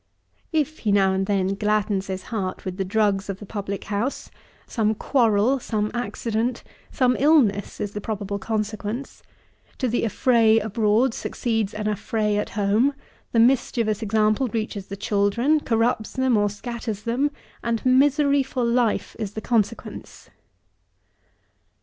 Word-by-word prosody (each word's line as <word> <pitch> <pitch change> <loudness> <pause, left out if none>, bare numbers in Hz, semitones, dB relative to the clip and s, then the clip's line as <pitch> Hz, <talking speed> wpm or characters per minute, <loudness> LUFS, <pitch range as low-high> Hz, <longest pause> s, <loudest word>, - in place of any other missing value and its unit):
If 310 -1 0
he 210 - 0
now 195 -1 +4
and 190 0 -1
then 195 -2 +1
gladdens 210 -1 0
his 190 -1 -4
heart 190 -4 -3
with 185 -1 -4
the 195 - 0
drugs 200 0 +1
of 195 - -3
the 205 - -10
public 200 -1 -5
house, 210 +7 -3 0.3
some 220 -1 0
quarrel, 235 +1 +2
some 215 -3 -2
accident, 235 0 -2 0.3
some 250 -1 +2
illness, 265 -9 +3
is 205 - -3
the 210 - -5
probable 200 -1 -3
consequence; 215 +3 -4 0.6
to 255 - 0
the 240 0 0
affray 230 0 +3
abroad 220 +3 +2
succeeds 225 -4 -2
an 210 0 -4
affray 210 0 0
at 210 - -3
home; 215 +8 +2 0.4
the 230 - +2
mischievous 230 -3 +2
example 215 +3 +2
reaches 215 -4 -4
the 200 - -6
children, 215 +8 +2
corrupts 225 -4 0
them 260 -2 +2
or 205 -1 +2
scatters 220 0 -5
them, 250 +6 +1 0.3
and 235 0 -1
misery 280 +2 +4
for 260 -1 -3
life 235 -1 +1
is 210 -2 -4
the 220 - -4
consequence. 225 -1 -3
220 Hz, 145 wpm, -24 LUFS, 205-245 Hz, 0.6 s, now